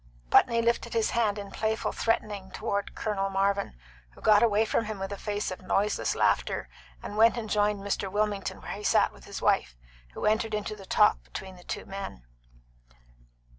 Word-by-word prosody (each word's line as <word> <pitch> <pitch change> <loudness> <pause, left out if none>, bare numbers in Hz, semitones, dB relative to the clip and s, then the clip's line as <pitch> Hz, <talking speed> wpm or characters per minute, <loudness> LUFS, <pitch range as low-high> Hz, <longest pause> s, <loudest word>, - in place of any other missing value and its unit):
Putney 230 0 +5
lifted 235 0 0
his 225 -1 +2
hand 215 -3 +1
in 200 -1 -7
playful 220 0 -1
threatening 210 -4 -1
toward 200 0 -3
Colonel 195 -3 -1
Marvin, 195 - 0 0.4
who - - -16
got 210 -1 +6
away 220 -1 +4
from 225 - 0
him 215 -1 -4
with 195 0 -5
a - - -2
face 205 0 -3
of 185 - -6
noiseless 200 +3 0
laughter, - - +1 0.3
and 205 - -6
went 230 +2 +5
and 225 -2 -3
joined 210 -1 +1
Mr. 200 -1 -2
Wilmington 205 -1 -1
where - - -6
he 205 - -6
sat - - +3
with - - -16
his - - -7
wife, - - +2 0.4
who - - -3
entered 220 0 +2
into 210 0 -3
the 195 -2 -13
talk - - +4
between 185 - -8
the 180 - -6
men. 195 - -7
205 Hz, 180 wpm, -28 LUFS, 195-220 Hz, 0.4 s, got